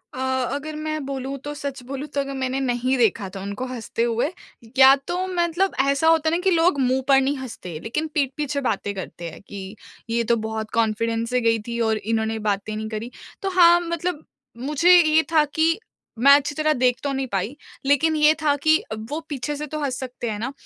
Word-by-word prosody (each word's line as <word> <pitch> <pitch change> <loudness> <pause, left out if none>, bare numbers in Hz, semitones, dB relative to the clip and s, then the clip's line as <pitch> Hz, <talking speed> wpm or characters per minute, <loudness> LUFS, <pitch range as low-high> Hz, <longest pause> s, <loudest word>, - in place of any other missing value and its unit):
अ, - - -6 0.4
अगर 305 +2 -5
मैं 310 0 -3
बोलूँ 270 0 -4
तो 290 0 -5
सच 280 -3 -5
बोलूँ 275 +3 -6
तो - - +1
अगर 275 0 -5
मैंने 260 +1 -1
नहीं 255 0 0
देखा 205 -4 +1
था 190 - -5
उनको 200 +6 -4
हँसते 235 -2 -3
हुए, 235 +5 0 0.5
या 265 0 +9
तो 350 - -2
मतलब 355 +1 0 0.2
ऐसा 280 +3 +2
होता 320 -1 +4
है 335 - +1
ना - - 0
कि 385 - +2
लोग 330 -3 +3
मुँह 260 0 +2
पर 270 -1 +6
नहीं 275 +2 0
हँसते 185 -11 -7
लेकिन 275 +8 -2
पीठ 280 -3 +1
पीछे 290 -1 -2
बातें 200 0 -2
करते 175 -3 -6
हैं - - -12
कि, 195 0 -8 0.3
ये 235 0 +1
तो 235 +1 +2
बहुत 220 0 -4
कॉन्फिडेंस 230 +1 0
से 250 0 +1
गई 230 -1 +2
थी 235 0 -3
और 220 - +1
इन्होंने 220 +1 -1
बातें 205 +2 -2
नहीं 215 0 -4
करी। 220 +3 -5 0.3
तो 390 - -1
हाँ, 345 -2 +6
मतलब 340 -1 -3 0.3
मुझे 300 +7 +2
ये 315 0 +3
था 310 -2 +5
कि 325 +3 +2 0.4
मैं 275 +4 +7
अच्छी 290 0 0
तरह 310 0 +2
देख 250 -1 +2
तो 280 - -1
नहीं 270 0 -2
पाई 205 +5 -2 0.3
लेकिन 300 +3 +3
ये 305 0 +5
था 290 -2 +3
कि 315 0 +5 0.3
वो 300 - -2
पीछे 290 +1 -3
से 300 +1 -5
तो 305 +2 -5
हँस 260 -3 -2
सकते 250 -2 -5
हैं 210 - -3
ना 245 +5 -3
270 Hz, 215 wpm, -23 LUFS, 230-305 Hz, 0.5 s, या